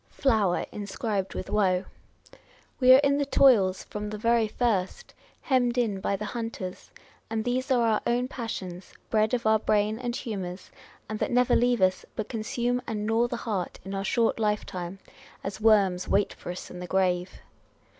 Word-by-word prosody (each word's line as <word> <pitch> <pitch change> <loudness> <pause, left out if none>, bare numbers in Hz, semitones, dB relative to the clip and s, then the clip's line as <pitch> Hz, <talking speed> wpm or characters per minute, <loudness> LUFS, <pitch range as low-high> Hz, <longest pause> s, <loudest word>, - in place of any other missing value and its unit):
flower 220 -10 +1
inscribed 200 -1 -3
with - - -4
woe 190 -3 +1 0.4
:" - - -26
we 255 -1 +6
are 260 - +10
in 280 0 +3
the 285 - +1
toils 210 -10 +4
from 210 0 -6
the 215 - -5
very 230 0 +2
first, 225 - -1 0.3
hemmed 250 -3 +1
in 220 -5 +1
by 200 +1 -1
the 210 +2 -5
hunters; 220 -4 -6 0.4
and 220 0 -2
these 255 +3 -1
are 245 -3 +3
our 215 -1 +2
own 245 +1 +1
passions, 190 -8 -6 0.2
bred 215 0 +2
of 235 - -4
our 220 0 +4
brain 215 +1 +1
and 240 -1 -3
humours, 190 -7 -5 0.4
and 215 0 -4
that - - 0
never 250 0 +3
leave 245 -3 +2
us, 185 0 +2
but 215 -2 -3
consume 240 +2 -1
and 210 -2 -3
gnaw 225 +2 +2
the 240 - -4
heart 200 -6 -3
in 195 - -6
our 195 0 -2
short 230 +2 +1
lifetime, 195 -4 -2 0.5
as 195 +2 -5
worms 195 -5 +3
wait 200 0 +2
for - - -10
us 180 - -8
in 180 - -8
the 180 - -6
grave 180 -1 0
215 Hz, 180 wpm, -27 LUFS, 195-240 Hz, 0.5 s, are